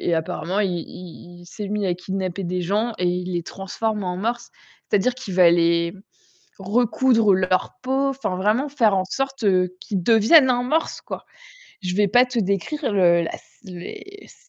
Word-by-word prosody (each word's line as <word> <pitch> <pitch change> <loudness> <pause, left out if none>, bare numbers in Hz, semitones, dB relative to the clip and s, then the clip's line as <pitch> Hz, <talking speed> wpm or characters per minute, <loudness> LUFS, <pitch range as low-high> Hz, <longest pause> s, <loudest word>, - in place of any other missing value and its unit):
apparemment, 175 +4 -2
il 195 -3 +1
il 175 0 -11
il 175 - -14
s'est 200 +3 -7
mis 210 -1 -2
à 180 - +1
kidnapper 190 +1 -4
des 180 +1 -2
gens 215 +6 0
et 180 - -1
il 180 +1 -2
les 175 -1 -2
transforme 210 +3 -4
en 180 0 -3
morse. 235 +4 -3 0.4
C'est-à-dire 210 +5 +2
qu'il 225 -8 -7
va 180 -2 +7
les 170 0 +2 0.7
recoudre 225 +1 +2
leur 185 0 0
peau, 265 +2 +1
enfin, 265 -9 -3
vraiment 215 +9 +1
faire 230 -8 +2
en 185 - +1
sorte 270 +2 -3 0.4
qu'ils 195 -4 -3
deviennent 230 - +5
un 245 0 +1
morse, 310 +6 -1
quoi. - - -8 0.6
Je 180 0 -3
vais 205 0 +3
pas 245 +5 +5
te 250 -1 -6
décrire 215 - -1
le 170 -3 +4
la 165 - -4
sc - - -9 0.4
mais 400 0 -11
c - - -17
200 Hz, 180 wpm, -22 LUFS, 180-240 Hz, 0.7 s, va